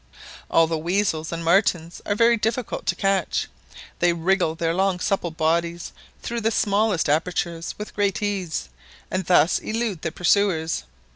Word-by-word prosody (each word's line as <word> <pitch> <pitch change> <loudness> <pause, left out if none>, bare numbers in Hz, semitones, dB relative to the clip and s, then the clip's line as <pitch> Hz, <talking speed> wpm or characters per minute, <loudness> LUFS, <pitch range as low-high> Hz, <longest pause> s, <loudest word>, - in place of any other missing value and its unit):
All 165 - +5
the 160 0 -2
weasels 170 -2 0
and 165 0 -4
martens 170 -2 +2
are 205 - +1
very 235 +2 +5
difficult 225 -1 -2
to 175 - +2
catch; 195 -2 0 0.5
they 175 0 +3
wriggle 170 -1 +1
their 165 -1 0
long 190 0 +1
supple 185 -2 0
bodies 170 +1 -1 0.3
through 235 0 -3
the 225 - +2
smallest 205 -4 +1
apertures 170 +2 -1
with 210 - -7
great 200 -2 0
ease, 185 - -2 0.4
and 185 0 -1
thus 175 -2 +4
elude 220 -6 -3
their 160 - -2
pursuers. 170 - +1
180 Hz, 150 wpm, -23 LUFS, 165-200 Hz, 0.5 s, All